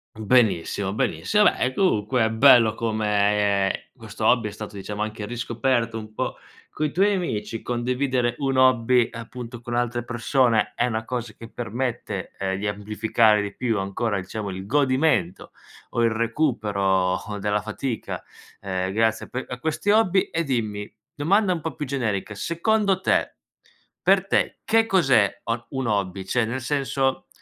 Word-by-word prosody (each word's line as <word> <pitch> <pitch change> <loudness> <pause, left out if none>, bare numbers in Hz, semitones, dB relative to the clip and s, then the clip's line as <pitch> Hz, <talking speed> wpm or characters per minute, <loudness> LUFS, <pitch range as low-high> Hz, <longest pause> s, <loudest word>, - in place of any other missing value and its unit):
Benissimo, 105 -4 +1
benissimo. 210 - +1
Vabbè 130 -9 +2
comunque 125 - +2
è - - +1
bello 115 -2 +6
come, 105 -3 +1
ehm, - - +1 0.2
questo 110 -3 -6
hobby 120 -1 +4
è - - -6
stato, 105 0 -8
diciamo, 105 +2 -4
anche 110 -1 -5
riscoperto 120 -1 -1
un 110 0 -10
po' - - -3 0.3
coi 155 -1 -2
tuoi 200 +5 +3
amici. 115 - -3
Condividere 125 0 0
un 135 -2 0
hobby 125 -2 +4
appunto 120 0 -8
con 120 0 -4
altre 120 0 -1
persone 120 -1 +1
è 120 - +1
una 110 -1 -3
cosa 120 -4 -4
che 115 0 -10
permette, 120 -4 -4
ehm, 95 -1 -1
di 105 - -4
amplificare 105 +1 +2
di 100 - -5
più 115 -4 -1
ancora, 100 +2 -1
diciamo, 100 +2 -5
il 95 +1 -6
godimento 130 - +1 0.4
o 120 - 0
il 115 - +4
recupero, 105 -7 0
ehm, - - -4
della 105 +1 0
fatica, 110 +3 -4 0.4
ehm, 95 -1 -2
grazie 110 0 +1
a - - -26
pe 130 - -4
a 125 0 -6
questi 160 +7 0
hobby. 200 -3 +4
E 165 +1 0
dimmi 110 -7 -3 0.2
domanda 185 +5 +2
un 165 - -4
po' 160 -2 -4
più 150 - -4
generica: 110 -7 -2
secondo 195 - 0
te - - +1 0.7
per - - +3
te - - 0
che 225 0 +3
cos'è, 135 - +3
uhm, 115 0 -3
un 130 -2 -3
hobby? 100 -2 -1
Cioè 120 +4 +1
nel 120 +3 -3
senso, 135 0 -1
115 Hz, 160 wpm, -24 LUFS, 105-130 Hz, 0.7 s, bello